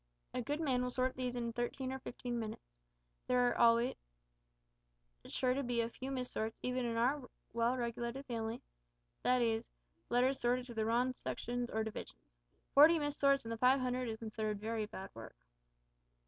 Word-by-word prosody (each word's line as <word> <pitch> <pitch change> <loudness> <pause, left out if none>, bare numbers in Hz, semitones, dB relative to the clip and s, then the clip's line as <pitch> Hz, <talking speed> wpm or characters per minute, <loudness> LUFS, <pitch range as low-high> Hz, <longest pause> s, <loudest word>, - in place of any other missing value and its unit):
A 250 - -1
good 290 +5 -2
man 265 -6 +1
will 250 - 0
sort 255 +1 0
these 250 -1 -2
in 235 -1 -2
thirteen 255 +2 -2
or 265 - -4
fifteen 245 -2 -4
minutes. 215 - -6 0.6
There 250 -1 +4
are - - +1
always 235 +1 +5 1.3
sure 255 -1 +1
to 275 - 0
be 245 -2 -1
a 230 0 -2
few 260 +3 -6
mis 255 -2 -3
sorts, 220 +1 -2
even 250 0 0
in 230 -1 -1
our 255 +3 +1 0.2
well 235 +2 +2
regulated 240 +2 -3
family 230 -1 -3 0.6
that 250 -1 +3
is, 225 -1 0 0.4
letters 255 +3 +3
sorted 245 +1 +1
to 245 - -8
the 220 -1 0
wrong 245 +3 +2
sections 245 -1 -3
or 220 0 0
divisions. 205 - -8 0.4
Forty 310 +4 +8
mis 290 -1 -1
sorts 275 -3 +3
in 225 - -4
the 230 - -2
five 255 +3 +5
hundred 250 -1 -1
is 220 - -3
considered 215 -2 -3
very 220 0 -2
bad 195 -2 -8
work." 110 - -10
245 Hz, 180 wpm, -36 LUFS, 230-255 Hz, 1.3 s, Forty